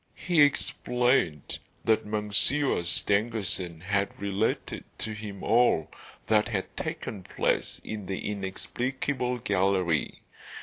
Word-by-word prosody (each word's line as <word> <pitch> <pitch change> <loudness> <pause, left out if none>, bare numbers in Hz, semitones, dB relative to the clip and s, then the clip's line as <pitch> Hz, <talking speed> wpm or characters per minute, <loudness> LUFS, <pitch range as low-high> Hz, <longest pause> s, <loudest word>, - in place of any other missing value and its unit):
He 175 -4 +2
explained 125 - +2 0.3
that 110 -1 +3
Monsieur 105 +6 +1
Stangerson 95 -2 0
had 100 +2 -1
related 100 +2 -1
to 110 - -3
him 105 -2 -7
all 115 -8 +3 0.3
that 110 -1 +3
had 100 -5 -3
taken 100 - -4
place - - -1
in 105 -3 -5
the 95 - -3
inexplicable 125 +6 -2
gallery. 95 -6 +1
105 Hz, 100 wpm, -28 LUFS, 95-120 Hz, 0.3 s, that